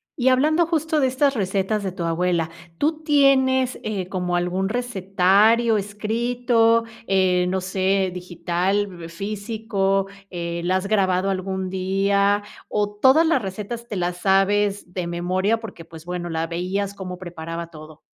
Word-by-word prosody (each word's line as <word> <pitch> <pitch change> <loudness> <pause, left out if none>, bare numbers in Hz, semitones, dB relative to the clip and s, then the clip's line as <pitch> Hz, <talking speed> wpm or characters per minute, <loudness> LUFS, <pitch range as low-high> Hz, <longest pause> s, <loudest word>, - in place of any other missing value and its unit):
Y 260 -4 0
hablando, 310 +6 +3
justo 320 -2 0
de 265 - +4
estas 275 +2 +2
recetas 200 -1 -1
de 190 - -2
tu 175 -1 -5
abuela, 170 0 0 0.3
¿tú 315 - 0
tienes, 265 -3 +3
eh, 200 -4 -3
como 180 -2 -2
algún 180 +2 -1
recetario 215 0 +3
escrito, 230 +3 +1 0.2
eh, 185 -2 +3
no 190 0 0
sé, 190 0 0
digital, 180 +1 -2
físico? 200 +1 -1 0.2
Eh, 170 -1 -4
¿la 185 - +2
has 190 - -4
grabado 195 -2 +2
algún 190 0 -3
día 200 +2 +1 0.3
o 205 -1 0
todas 275 +5 +6
las 320 -6 +2
recetas 210 +4 -6
te 210 - -4
las 175 0 -1
sabes 195 0 +1
de 180 -2 -3
memoria, 185 +6 0
porque, 200 -7 -9
pues, 165 0 -13
bueno, 175 -1 -4
la 165 0 -1
veías 185 +4 -2
cómo 185 -2 -7
preparaba 170 -1 -6
todo? 155 -1 -12
195 Hz, 145 wpm, -22 LUFS, 180-225 Hz, 0.3 s, todas